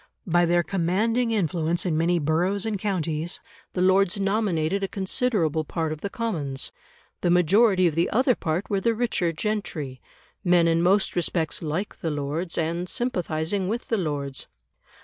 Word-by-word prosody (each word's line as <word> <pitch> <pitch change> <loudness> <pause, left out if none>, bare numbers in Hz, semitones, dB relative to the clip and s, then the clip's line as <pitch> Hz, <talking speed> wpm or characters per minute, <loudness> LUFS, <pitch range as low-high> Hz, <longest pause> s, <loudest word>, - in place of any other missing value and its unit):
By 175 0 +3
their 175 0 +3
commanding 205 +7 +1
influence 170 -5 0
in 170 -4 +1
many 170 +2 +2
boroughs 175 +6 +1
and 215 -3 -2
counties 175 -4 -1 0.3
the 180 - 0
Lords 190 +1 +3
nominated 195 -3 0
a 195 - 0
considerable 190 - 0
part 160 +1 -2
of 155 -1 -5
the 200 - -3
Commons; 155 - -3 0.5
the 175 - +1
majority 185 +3 +4
of 170 - +2
the 165 +3 +1
other 255 +3 +3
part 170 -1 -2
were 195 -2 0
the 230 +1 +2
richer 215 -7 0
gentry 160 - -3 0.4
men 175 -2 +4
in 165 0 +3
most 195 +3 +2
respects 170 -2 0
like 170 +6 -3
the 165 - -1
Lords, 150 +4 -2
and 170 +2 -1
sympathising 180 -5 -1
with 230 +5 -3
the 225 - +2
Lords. 145 -6 -3
175 Hz, 160 wpm, -25 LUFS, 160-200 Hz, 0.5 s, majority